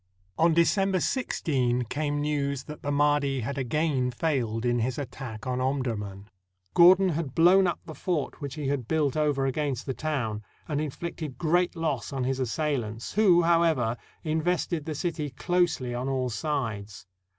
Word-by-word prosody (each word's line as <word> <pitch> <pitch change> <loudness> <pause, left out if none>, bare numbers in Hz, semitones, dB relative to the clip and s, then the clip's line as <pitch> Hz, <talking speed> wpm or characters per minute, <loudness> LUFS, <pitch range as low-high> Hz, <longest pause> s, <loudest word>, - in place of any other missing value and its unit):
On 165 0 +3
December 190 +3 +3
16 130 - 0
came 145 +4 -2
news 140 -2 -1
that 150 0 -9
the 145 - -2
Mahdi 145 -2 +2
had 140 +4 -3
again 135 0 0
failed 120 -4 -1
in 120 0 +2
his 120 +2 -1
attack 125 -5 -6
on 130 0 -1
Omdurman, 110 -7 -2 0.5
Gordon 185 +2 +7
had 155 -5 -3
blown 180 +3 +6
up 175 - -1
the 160 - -8
fort 155 0 -3
which 140 -2 -5
he 150 -3 -3
had 135 -4 -1
built 150 -3 +1
over 145 -3 +1
against 135 -2 -1
the 135 - -2
town, 120 -6 -2 0.3
and 150 -1 -1
inflicted 155 -1 -5
great 175 +2 +1
loss 160 -6 -2
on 135 -2 -2
his 130 +1 -1
assailants, 125 -4 -2
who, 185 -5 +5
however, 165 -9 +3 0.3
invested 160 0 0
the 155 - -3
city 155 -2 -2
closely 155 -3 0
on 125 +2 -2
all 130 -2 -1
sides. 110 - -3
145 Hz, 160 wpm, -27 LUFS, 125-160 Hz, 0.5 s, Gordon